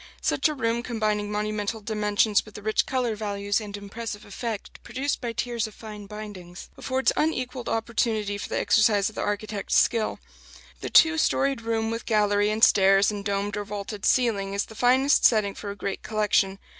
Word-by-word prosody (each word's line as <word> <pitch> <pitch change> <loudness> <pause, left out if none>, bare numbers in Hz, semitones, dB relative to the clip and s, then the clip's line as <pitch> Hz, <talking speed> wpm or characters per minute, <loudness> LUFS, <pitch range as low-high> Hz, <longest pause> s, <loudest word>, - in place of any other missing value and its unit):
Such - - +2
a 305 - -3
room, 235 -3 0
combining 215 -4 -1
monumental 210 +1 -2
dimensions 210 0 +1
with 215 - -15
the 210 - -9
rich 215 0 +1
color 250 -4 -1
values 205 0 -2
and 205 -1 -7
impressive 205 +1 -7
effect 215 +1 -6
produced 265 +4 -3
by 240 -2 -3
tiers 235 -1 -2
of 215 - -14
fine 210 -2 -9
bindings, 195 -4 -9
affords 260 0 0
unequalled 255 -5 -1
opportunity 220 -2 -1
for - - -6
the - - -1
exercise 215 -2 +3
of - - -14
the - - -3
architect's 205 0 -2
skill. 225 -2 +2 0.6
The - - -5
two 325 0 +6
storied 275 -5 +1
room 225 0 -1
with 230 +1 -5
gallery 205 -2 +2
and 215 +1 -2
stairs 195 +1 +5
and 205 -1 -5
domed 200 0 -2
or 205 - -3
vaulted 205 0 -6
ceiling 200 -6 +1
is 200 - 0
the - - -13
finest 260 +5 +3
setting 210 -4 +4
for 205 - -7
a 200 - -5
great 200 0 -4
collection. 205 -3 +1
215 Hz, 180 wpm, -25 LUFS, 205-230 Hz, 0.6 s, two